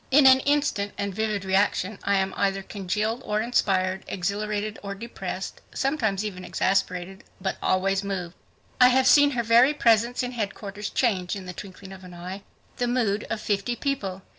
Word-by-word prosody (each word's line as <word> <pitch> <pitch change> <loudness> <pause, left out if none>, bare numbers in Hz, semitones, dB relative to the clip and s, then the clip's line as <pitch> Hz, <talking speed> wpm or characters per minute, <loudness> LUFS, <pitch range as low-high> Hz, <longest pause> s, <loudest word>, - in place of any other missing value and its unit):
In 280 +1 +6
an 260 0 +8
instant 280 -8 0
and 200 -1 -2
vivid 210 -1 -2
reaction, 190 +1 +1
I 200 - +2
am 190 0 0
either 195 -1 0
congealed 210 +5 -2
or 210 0 -1
inspired; 190 -5 +1
exhilarated 210 +3 -2
or 200 -1 -5
depressed; 230 +4 -6
sometimes 220 -8 0
even 185 -3 -5
exasperated, 190 0 -1 0.2
but 190 0 -2
always 195 +1 +1
moved. 185 -4 -4 0.5
I 250 - +9
have 260 +1 +4
seen 290 -1 +7
her 235 - +1
very 240 +6 +5
presence 235 -1 +3
in 245 - -3
headquarters 205 -2 -4
change 190 -8 0
in 195 -2 -7
the 180 - -6
twinkling 195 0 -10
of 190 -1 -12
an 180 -1 -11
eye 180 +3 -7 0.4
the 245 - 0
mood 230 -4 0
of 225 -1 -3
fifty 205 +3 -1
people. 195 -10 -3
200 Hz, 170 wpm, -25 LUFS, 190-235 Hz, 0.5 s, I